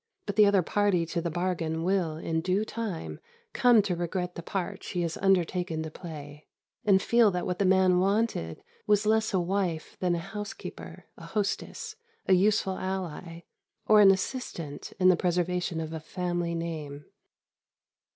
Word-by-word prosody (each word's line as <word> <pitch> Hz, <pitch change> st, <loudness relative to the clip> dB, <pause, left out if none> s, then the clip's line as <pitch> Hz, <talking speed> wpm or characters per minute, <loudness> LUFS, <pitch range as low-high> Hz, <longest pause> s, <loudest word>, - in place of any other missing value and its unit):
But 205 Hz, -, -3 dB
the 210 Hz, 0 st, +6 dB
other 200 Hz, -2 st, +4 dB
party 200 Hz, -3 st, +1 dB
to 170 Hz, +1 st, -3 dB
the 170 Hz, -, -2 dB
bargain 165 Hz, -1 st, -2 dB
will, 175 Hz, -4 st, 0 dB
in 160 Hz, 0 st, -2 dB
due 185 Hz, +5 st, 0 dB
time, 215 Hz, -8 st, -5 dB, 0.3 s
come 240 Hz, -4 st, +5 dB
to 185 Hz, -3 st, -1 dB
regret 180 Hz, +1 st, -3 dB
the 170 Hz, -, -7 dB
part 190 Hz, +2 st, -4 dB
she 175 Hz, -1 st, -3 dB
has 165 Hz, -1 st, -2 dB
undertaken 180 Hz, -3 st, +1 dB
to 160 Hz, -, -6 dB
play, 150 Hz, -3 st, -9 dB, 0.4 s
and 200 Hz, -4 st, +5 dB
feel 235 Hz, +2 st, +4 dB
that 180 Hz, -2 st, -2 dB
what 180 Hz, -, -3 dB
the 200 Hz, -, +2 dB
man 185 Hz, -1 st, +4 dB
wanted 195 Hz, -, 0 dB, 0.2 s
was 210 Hz, 0 st, +3 dB
less 220 Hz, 0 st, +2 dB
a 190 Hz, -, +2 dB
wife 175 Hz, -3 st, -2 dB
than 180 Hz, -1 st, +1 dB
a 170 Hz, +3 st, -6 dB
housekeeper, 210 Hz, -1 st, -7 dB
a -, -, -11 dB
hostess, 205 Hz, -2 st, -3 dB, 0.3 s
a 190 Hz, -, +4 dB
useful 195 Hz, 0 st, +2 dB
ally, 180 Hz, -3 st, -5 dB, 0.4 s
or 210 Hz, 0 st, +6 dB
an 200 Hz, -, +8 dB
assistant 185 Hz, -, -2 dB
in 185 Hz, 0 st, +6 dB
the 185 Hz, -, +6 dB
preservation 175 Hz, -1 st, -1 dB
of 160 Hz, 0 st, -5 dB
a 160 Hz, -, -4 dB
family 175 Hz, +1 st, -3 dB
name. 155 Hz, -4 st, -5 dB
180 Hz, 165 wpm, -28 LUFS, 165-195 Hz, 0.4 s, an